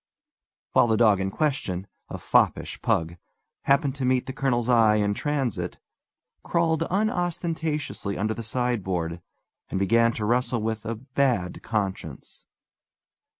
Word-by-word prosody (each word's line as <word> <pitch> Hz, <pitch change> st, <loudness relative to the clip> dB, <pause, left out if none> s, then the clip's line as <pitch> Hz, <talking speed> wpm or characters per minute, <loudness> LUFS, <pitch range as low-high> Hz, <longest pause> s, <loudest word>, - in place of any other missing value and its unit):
while -, -, +4 dB
the 110 Hz, -1 st, +2 dB
dog 105 Hz, -4 st, +5 dB
in 95 Hz, 0 st, -1 dB
question 100 Hz, -, -1 dB, 0.2 s
a -, -, -5 dB
foppish -, -, +1 dB
pug 85 Hz, +1 st, 0 dB, 0.5 s
happening 140 Hz, 0 st, +3 dB
to 135 Hz, -1 st, -5 dB
meet 130 Hz, 0 st, +2 dB
the 130 Hz, -, -5 dB
colonel's 125 Hz, -4 st, 0 dB
eye 115 Hz, -3 st, +5 dB
in 105 Hz, -1 st, +1 dB
transit, 135 Hz, -2 st, -2 dB, 0.6 s
crawled 165 Hz, -2 st, +1 dB
unostentatiously 170 Hz, -, -1 dB
under 110 Hz, +2 st, 0 dB
the 115 Hz, -, -6 dB
sideboard, 95 Hz, -8 st, -2 dB, 0.5 s
and -, -, -2 dB
began 115 Hz, +4 st, +3 dB
to 110 Hz, -2 st, -4 dB
wrestle 120 Hz, 0 st, +1 dB
with 110 Hz, 0 st, -3 dB
a 115 Hz, +1 st, -2 dB
bad 125 Hz, -6 st, -1 dB
conscience. 105 Hz, -4 st, -4 dB
115 Hz, 130 wpm, -25 LUFS, 105-135 Hz, 0.6 s, dog